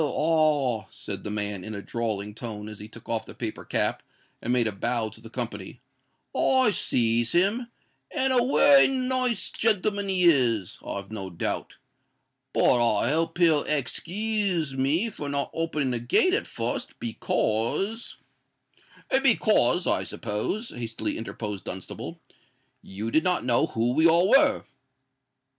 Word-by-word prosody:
ah!" 150 -6 +1
said - - -7
the - - -4
man, 105 -2 -2
in 110 +1 -6
a 100 - -5
drawling 105 -3 -3
tone, 105 -2 -7
as 110 -1 -9
he 105 - -8
took 115 +1 -14
off 115 -1 -1
the - - -12
paper - - -5
cap, - - 0 0.4
and 120 - -2
made 125 -2 +3
a 110 - 0
bow 115 +2 -2
to 110 +1 -12
the 115 - -11
company; 115 -2 -6 0.6
"I 260 -4 +3
sees 115 - +1
him, 205 +8 +2 0.4
and 265 -3 0
a 250 - +4
wery 275 +2 +6
nice 255 -4 -1
gentleman 205 -2 0
he 185 -1 +2
is, 120 - +3
I've 100 +1 -6
no 100 -3 -5
doubt. 85 - -4 0.7
But 120 - +3
I 115 +2 +2
hope 165 +2 0
he'll 165 -4 +4
ex 145 -4 0
kooze 195 -5 0
me 155 - +1
for 145 -6 -6
not 140 0 -2
opening 155 -5 -1
the 120 - -1
gate 245 - +2
at - - 0
fust, - - -4
because——" 120 - -2 1.0
"Because, 210 - +3
I - - +2
suppose," 125 - -3
hastily 115 -1 -4
interposed 105 -3 -6
Dunstable, 95 0 -6 0.6
"you 105 +4 -5
did 155 - +3
not 180 -8 +1
know 120 -2 +2
who 115 +2 0
we 160 +5 +5
all 170 +4 +4
were." 275 -1 +5
135 Hz, 150 wpm, -26 LUFS, -, 1.0 s, wery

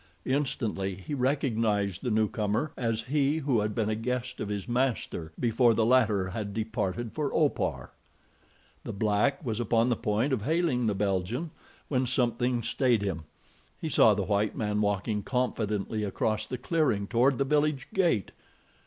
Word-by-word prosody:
Instantly 115 -8 -1
he 95 +10 -7
recognized 115 - 0
the 125 - -2
newcomer 110 +5 0
as 115 -2 -1
he 140 +3 +1
who 135 -6 +1
had 105 0 -2
been 110 -3 0
a 110 - 0
guest 125 +3 -3
of 105 - -3
his 100 -2 -4
master 120 -9 -1
before 120 0 +3
the 110 - +2
latter 110 -6 +3
had 100 +1 -5
departed 110 0 -2
for 150 -3 -2
Opar. 150 -3 0 0.9
The - - -5
black 105 +8 +1
was 115 -2 -2
upon 115 +1 +2
the 120 - +2
point 115 +5 0
of 120 - 0
hailing 145 -3 +1
the 105 - +1
Belgian 100 - -1 0.4
when 130 -2 0
something 120 -1 +1
stayed 120 -2 +1
him. 85 -6 -3 0.5
He 160 - -3
saw 110 -7 +5
the 100 - -1
white 105 +2 0
man 105 -1 -1
walking 105 +1 0
confidently 110 -3 -1
across 110 +1 -1
the 125 - -3
clearing 125 -7 +1
toward 125 +4 +2
the 140 - +1
village 150 -2 +1
gate. 170 - +1
115 Hz, 160 wpm, -28 LUFS, 105-130 Hz, 0.9 s, saw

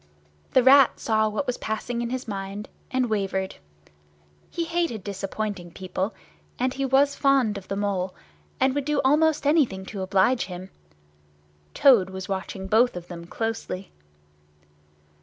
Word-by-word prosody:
The 260 - +5
Rat 270 0 +6
saw 220 -1 +2
what 215 +7 -2
was 250 -2 -2
passing 235 +2 -3
in 235 - -2
his 255 +1 -4
mind, 200 0 -5 0.2
and 255 -1 +1
wavered. 195 -3 -2 0.9
He 340 - -2
hated 330 - -1
disappointing 200 -1 -4
people, 190 +3 -4 0.4
and 255 +1 0
he 275 0 -2
was 275 +2 +4
fond 270 -7 +2
of 195 -2 -8
the 195 - -3
Mole, 195 -2 -1 0.4
and 265 0 +3
would 285 -1 -2
do 300 0 +1
almost 305 +2 +3
anything 275 -11 +2
to 200 0 -6
oblige 195 +6 +2
him. 185 +1 -8 1.0
Toad 235 -10 +6
was 190 -1 -6
watching 190 0 -4
both 225 +4 +3
of 175 -1 -8
them 170 -1 -8
closely. 225 -3 -4
215 Hz, 145 wpm, -25 LUFS, 190-260 Hz, 1.0 s, Rat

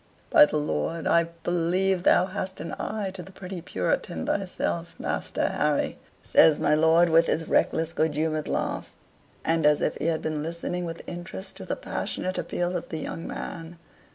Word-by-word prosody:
"By 300 -2 +8
the - - -1
Lord, 160 +2 -2
I 170 0 +4 0.2
believe 175 +2 +1
thou 180 - +5
hast 190 0 -5
an 165 - -5
eye 210 -2 -2
to 190 - -7
the 190 - -11
pretty 185 -1 -7
Puritan - - -2
thyself, 180 -3 -2
Master - - -1
Harry," - - 0 0.2
says 155 -2 +5
my - - +3
lord, 160 +2 +5
with 165 +1 +5
his 160 0 0
reckless, 165 0 +1
good 155 -2 +1
humored 155 0 -1
laugh, - - -2 0.5
and 165 0 +2
as 150 0 +5
if - - 0
he - - -4
had 165 -1 0
been 155 -1 -2
listening 170 +2 -3
with 165 0 -6
interest 175 +2 -7
to - - -8
the - - -2
passionate 185 0 -3
appeal 175 +1 -2
of 175 - -4
the 160 - -3
young 165 +1 -5
man. 165 +1 -6
170 Hz, 180 wpm, -26 LUFS, 160-185 Hz, 0.5 s, By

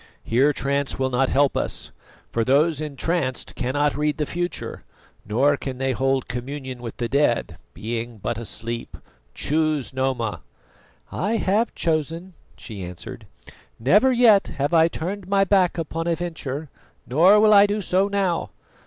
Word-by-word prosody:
Here 130 +6 +3
trance 140 0 -1
will 130 -1 -1
not 130 +1 +2
help 140 0 +2
us; - - -2 0.4
for 115 - 0
those 145 +4 +2
entranced 150 -2 -2
cannot 145 +3 0
read 150 0 0
the 150 - 0
future, 175 +3 -4 0.4
nor 135 +7 +3
can 130 -2 -5
they 135 0 0
hold 135 +2 0
communion 130 0 -6
with 115 -2 -7
the 120 - -2
dead, 135 -1 0 0.2
being 115 +1 -4
but 110 +3 -3
asleep. 115 +1 -5 0.4
Choose, 155 -3 0
Noma." 125 - -1 0.7
"I 205 +6 -1
have 215 +2 +1
chosen," 165 +3 -1 0.2
she 105 -5 -8
answered. 90 -1 -9 0.5
"Never 205 - +4
yet 235 -5 +5
have 140 +4 -1
I 165 -1 +6
turned 185 +4 -5
my 195 0 +3
back 190 -2 +2
upon 165 0 -3
a 170 - +2
venture, 160 -4 -5 0.4
nor 180 +11 +5
will 215 0 +6
I 205 0 +7
do 205 +1 -1
so 190 0 +1
now. 195 -4 -1
145 Hz, 150 wpm, -23 LUFS, 130-175 Hz, 0.7 s, I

